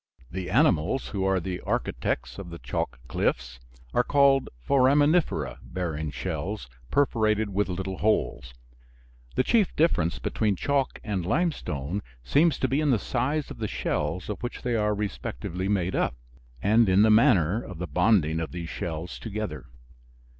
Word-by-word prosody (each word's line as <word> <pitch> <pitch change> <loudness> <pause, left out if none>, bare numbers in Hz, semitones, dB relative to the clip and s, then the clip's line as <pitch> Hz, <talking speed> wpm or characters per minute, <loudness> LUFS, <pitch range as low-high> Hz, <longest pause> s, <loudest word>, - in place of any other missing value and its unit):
The 95 0 -4
animals 115 - +2
who 100 -3 -2
are 95 -1 +2
the 90 0 -4
architects - - -2
of 95 -3 -7
the 85 - -7
chalk - - -3
cliffs 60 -1 -1 0.3
are - - +3
called 140 -2 +4 0.2
"foraminifera" 145 +5 +3
bearing 80 -4 -3
shells - - -4 0.2
perforated 110 -6 +2
with 100 +1 0
little 95 +1 -3
holes. 65 - 0 0.8
The - - +3
chief 215 - +2
difference 90 - +2
between 105 -3 0
chalk 140 +6 0
and 100 -5 -2
limestone 95 - -1 0.2
seems 150 - +3
to 130 - +3
be 135 +4 +1
in 150 - +2
the 125 - +4
size 135 +7 -1
of - - -9
the 110 - -1
shells 80 -1 -2
of 105 - -5
which 120 - -5
they 125 - 0
are 105 -1 +1
respectively 95 -3 -4
made 95 -3 0
up - - 0 0.5
and 110 +1 +4
in 95 +3 +5
the 110 - +5
manner 110 - +4
of 95 - -9
the 90 - -3
bonding 85 -1 +2
of 80 - -4
these 85 -2 -5
shells 85 +1 -5
together. 110 - -5
100 Hz, 155 wpm, -27 LUFS, 85-130 Hz, 0.8 s, in